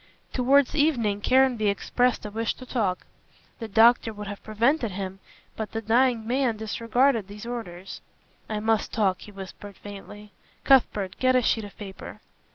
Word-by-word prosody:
Towards 270 +2 +3
evening 240 -10 +1
Caranby 255 -3 +3
expressed 245 +5 0
a 210 - -5
wish 225 +2 -2
to 255 - -11
talk. 210 -8 -1 0.5
The 225 - -5
doctor 225 +2 +4
would 210 -1 -8
have 205 0 -8
prevented 230 +4 +1
him, 190 0 -5 0.4
but 215 -3 -5
the 225 - -2
dying 235 +1 +2
man 245 -1 0
disregarded 230 +1 +1
these 210 +2 -10
orders. 195 -7 -7 0.5
"I 215 -1 -2
must 220 0 0
talk," 195 -4 0
he 210 - -11
whispered 195 +1 -10
faintly. 205 +1 -11 0.3
"Cuthbert, 210 -8 +3
get 255 0 +3
a 255 - +4
sheet 220 -1 +1
of 205 - -13
paper." 195 -2 -9
220 Hz, 160 wpm, -25 LUFS, 205-245 Hz, 0.5 s, doctor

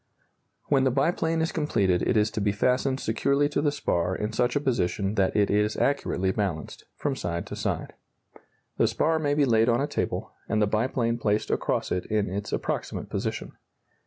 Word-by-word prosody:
] - - -48
When 135 -2 +4
the 130 - +4
biplane 160 +4 +1
is 160 - -1
completed 100 - +1
it 115 - +1
is 105 0 +2
to 105 - -3
be 100 0 +2
fastened 125 +5 +1
securely 140 +6 +1
to 145 - 0
the 145 -1 +2
spar 90 -10 0
in 105 +3 -3
such 120 +2 +1
a - - +3
position 105 -7 0
that 100 -3 +1
it 105 -1 +3
is 105 +1 +1
accurately 95 -9 +1
balanced 95 -6 -3
from 145 -2 -2
side 85 -7 -3
to - - -7
side. - - -3 0.8
The - - +4
spar 160 +1 +1
may 145 -2 +1
be 145 -1 +4
laid 115 -2 +3
on 120 0 +3
a 140 - +1
table, - - -3 0.2
and 110 - +1
the 105 - +4
biplane 115 +2 0
placed 105 -1 0
across - - -1
it 90 - -1
in 105 -1 0
its 100 +1 -4
approximate - - -3
position. - - -3
115 Hz, 195 wpm, -26 LUFS, 100-140 Hz, 0.8 s, When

